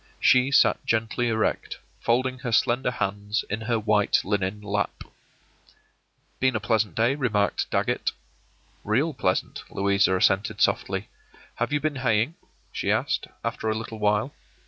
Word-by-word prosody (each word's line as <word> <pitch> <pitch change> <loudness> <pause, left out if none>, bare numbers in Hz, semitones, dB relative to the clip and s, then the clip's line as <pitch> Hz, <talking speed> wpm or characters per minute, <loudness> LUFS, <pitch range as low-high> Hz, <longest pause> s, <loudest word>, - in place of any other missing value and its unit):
She 130 +1 +4
sat 140 - +4
gently 115 +2 0
erect, 110 -1 -1 0.2
folding 130 +2 0
her 125 -3 -4
slender 120 +3 +2
hands 105 -2 -2
in 105 +2 -2
her 115 +1 0
white 105 -1 +2
linen 100 0 -1
lap. 105 -1 -2 1.4
“Been 130 -2 +2
a - - +1
pleasant 105 -4 0
day,” 115 +4 +3
remarked 110 -8 0
Dagget. - - 0 0.7
“Real 135 +10 +1
pleasant,” 95 -8 -1
Louisa 100 -1 +2
assented, 95 +2 +1
softly. - - 0 0.5
“Have 120 +4 -1
you 145 - +2
been 150 -1 -2
haying?” 120 +2 +1 0.4
she - - -1
asked, - - 0 0.2
after 115 -1 -2
a 110 - 0
little 110 0 -7
while. 105 +5 +1
110 Hz, 140 wpm, -25 LUFS, 105-125 Hz, 1.4 s, She